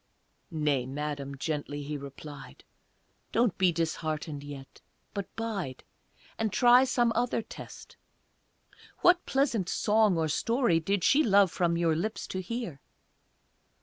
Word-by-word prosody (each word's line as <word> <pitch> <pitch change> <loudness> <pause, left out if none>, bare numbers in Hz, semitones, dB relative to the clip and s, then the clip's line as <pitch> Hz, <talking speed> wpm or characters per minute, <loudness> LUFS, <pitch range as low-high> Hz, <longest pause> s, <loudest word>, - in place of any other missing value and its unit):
"Nay, 150 -6 0
Madam," 140 0 -4
gently 145 0 -3
he 150 +1 -4
replied, 140 - -10 0.7
"Don't 230 -4 +2
be 185 -2 +4
disheartened 155 -2 -3
yet, 140 -2 -10 0.3
but 200 -2 -4
bide, 200 - -4 0.6
And 220 -2 0
try 245 +4 +6
some 240 -2 +2
other 235 0 0
test. - - -11 1.0
What 355 0 +5
pleasant 245 -9 +1
song 215 -3 +3
or 160 -1 +1
story 230 - +2
Did 195 +3 -1
she 295 - +5
love 200 - +5
from 170 -2 +1
your 165 -2 +2
lips 215 +7 -3
to 185 - -3
hear?" 185 - -5
170 Hz, 125 wpm, -29 LUFS, 150-225 Hz, 1.0 s, try